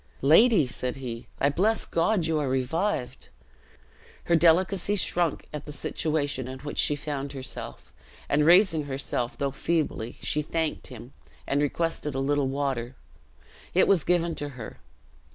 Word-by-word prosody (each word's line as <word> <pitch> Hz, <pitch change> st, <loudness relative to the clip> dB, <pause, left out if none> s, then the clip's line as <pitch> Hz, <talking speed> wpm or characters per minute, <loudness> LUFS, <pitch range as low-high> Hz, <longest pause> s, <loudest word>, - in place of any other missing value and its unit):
"Lady," 165 Hz, -, +6 dB
said 125 Hz, 0 st, -3 dB
he, 125 Hz, -3 st, -7 dB
"I 140 Hz, -, +3 dB
bless 200 Hz, +9 st, +1 dB
God 170 Hz, +2 st, +1 dB
you 160 Hz, -1 st, 0 dB
are 145 Hz, -3 st, -1 dB
revived." 135 Hz, +3 st, -2 dB, 0.9 s
Her 170 Hz, -, +2 dB
delicacy 180 Hz, +4 st, +3 dB
shrunk 175 Hz, -5 st, 0 dB
at 150 Hz, 0 st, -6 dB
the -, -, -5 dB
situation 145 Hz, -3 st, -2 dB
in 130 Hz, 0 st, -6 dB
which 145 Hz, 0 st, -4 dB
she 145 Hz, -, +4 dB
found 145 Hz, -1 st, -4 dB
herself; 130 Hz, -1 st, -6 dB, 0.3 s
and 145 Hz, +1 st, +2 dB
raising 170 Hz, -2 st, +5 dB
herself, 135 Hz, -3 st, -2 dB
though 140 Hz, -1 st, -1 dB
feebly, 140 Hz, -5 st, -2 dB
she 150 Hz, -, -1 dB
thanked 160 Hz, +1 st, -2 dB
him, 125 Hz, 0 st, -11 dB, 0.3 s
and 140 Hz, +1 st, 0 dB
requested 150 Hz, -1 st, -1 dB
a -, -, -1 dB
little 140 Hz, 0 st, +1 dB
water. 130 Hz, -3 st, -2 dB, 0.8 s
It 185 Hz, -, +5 dB
was 190 Hz, -6 st, +3 dB
given 170 Hz, -1 st, +1 dB
to 145 Hz, -, -3 dB
her. 125 Hz, -5 st, -9 dB
145 Hz, 150 wpm, -26 LUFS, 135-165 Hz, 0.9 s, Lady